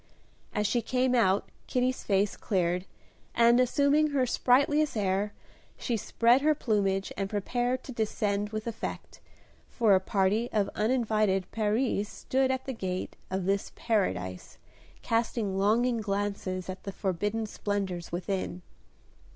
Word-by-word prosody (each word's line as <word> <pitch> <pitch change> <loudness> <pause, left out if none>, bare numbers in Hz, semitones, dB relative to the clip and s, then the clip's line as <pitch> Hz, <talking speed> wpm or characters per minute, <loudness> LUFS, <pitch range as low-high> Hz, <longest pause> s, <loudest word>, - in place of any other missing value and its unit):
As 210 - -1
she 240 +3 +1
came 255 +2 +1
out 205 -5 +3 0.2
Kitty's 255 0 0
face 200 0 +1
cleared, 180 -3 -1 0.5
and, 235 +1 +5
assuming 285 +4 +3
her 280 -3 +1
sprightliest 280 +3 +2
air, 200 0 0 0.5
she 240 - -1
spread 235 +4 +3
her 305 +1 +3
plumage 200 -6 0
and 195 -1 -2
prepared 245 +5 -1
to - - -8
descend 210 -3 -1
with 215 0 -4
effect, 230 -1 -6 0.5
for 225 -4 +3
a 190 - +6
party 200 +5 +1
of 205 -2 0
uninvited 215 -5 +1
peris 215 -1 0
stood 265 0 0
at 260 0 -1
the 265 - -3
gate 185 -5 -4
of 190 -1 -2
this 195 +1 0
Paradise 95 - -2 0.5
casting 225 -4 0
longing 235 +4 +2
glances 200 -2 -2
at 185 0 -6
the 200 - -5
forbidden 205 +4 -2
splendors 195 -4 -3
within. 180 0 -3
210 Hz, 135 wpm, -29 LUFS, 195-245 Hz, 0.5 s, a